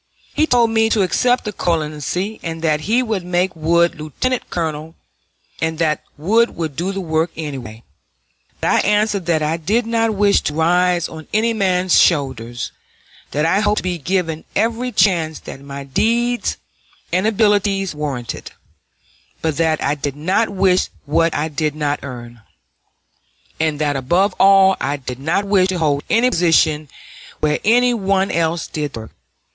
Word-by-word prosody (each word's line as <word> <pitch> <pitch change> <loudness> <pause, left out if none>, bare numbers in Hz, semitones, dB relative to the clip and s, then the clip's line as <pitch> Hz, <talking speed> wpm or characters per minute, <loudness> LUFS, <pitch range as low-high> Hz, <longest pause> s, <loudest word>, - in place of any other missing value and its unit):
He 310 - +2
told 235 -4 +3
me 220 0 +3
to 215 -3 +2
accept 245 +7 +1
the 210 - -4
colonelcy, 170 +5 -2
and 165 -1 -5
that 155 -2 +1
he 245 +3 +3
would 215 -6 -2
make 180 +1 0
Wood 170 +1 +2
lieutenant 235 - -3
colonel, 160 -1 -4 0.7
and 160 0 -1
that 155 -2 0 0.2
Wood 225 +10 +2
would 160 -4 -4
do 175 +6 -2
the 195 - -4
work 160 -1 0
anyway; 130 -8 -7 0.8
but - - 0
I - - +4
answered 210 -3 +1
that 160 -3 +1
I 155 +2 0
did 215 +9 0
not 225 -1 0
wish 200 0 +3
to 150 - -3
rise 175 +1 +2
on 160 -1 -10
any 230 +2 +2
man's 185 -4 +2
shoulders; 125 -7 0 0.6
that 150 +2 0
I 185 +4 +2
hoped 210 0 +1
to - - -1
be 180 -2 -2
given 165 0 -1
every 230 +4 0
chance 165 -8 +2
that 135 - -9
my 140 0 -7
deeds 235 - 0 0.6
and 185 +4 +2
abilities 205 -3 +1
warranted; 140 -6 -5 0.9
but 160 -3 -1
that 160 -1 +1
I 140 - +1
did 145 -1 -4
not 185 +9 0
wish 190 -2 +2 0.2
what 165 +3 +2
I 150 +2 0
did 150 -1 -2
not 145 -1 -1
earn, 120 -3 -9 1.2
and 155 -1 0
that 145 -1 0
above 175 +10 +1
all 195 -1 +6
I 140 +4 -1
did 125 -2 -7
not 165 +8 0
wish 195 -2 +3
to 190 -1 -2
hold 145 -4 0
any 240 +3 +3
position 155 - +2 0.5
where 150 0 +1
any 245 +3 +4
one 195 -3 0
else 165 0 0
did 150 -2 -4
the - - -6
work. 110 - -12
170 Hz, 165 wpm, -19 LUFS, 150-200 Hz, 1.2 s, all